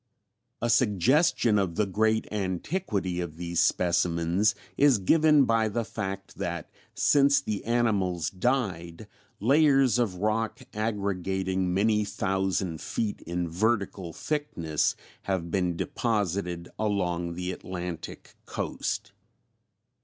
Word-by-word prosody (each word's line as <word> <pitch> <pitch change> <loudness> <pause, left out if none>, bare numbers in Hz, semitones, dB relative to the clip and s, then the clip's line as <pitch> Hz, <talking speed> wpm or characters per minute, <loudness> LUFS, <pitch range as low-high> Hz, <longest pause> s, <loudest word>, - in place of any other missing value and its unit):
A 120 - +1
suggestion 115 - +3
of 90 -4 -1
the 105 - +2
great 110 +3 +1
antiquity 100 - -2
of 80 -2 -6
these 85 0 0
specimens 85 +3 +2 0.2
is 140 -4 +5
given 150 - +4
by 115 -2 +2
the 115 +2 -2
fact 100 -3 -5
that - - -4 0.2
since 140 -1 +4
the 105 -2 -4
animals 100 -8 +1
died 90 -6 -2 0.3
layers 135 -1 +4
of 110 -7 0
rock 110 +4 -1 0.2
aggregating 95 -3 -1
many 105 +3 +2
thousand 95 -4 -1
feet 105 -3 -3
in 85 0 -2
vertical 100 -1 -1
thickness 85 - -1 0.3
have 85 -3 -1
been 90 -2 0
deposited 95 -7 -1
along 90 -5 -1
the 90 +1 -3
Atlantic 90 -2 -7
coast. - - -3
100 Hz, 110 wpm, -27 LUFS, 90-115 Hz, 0.3 s, is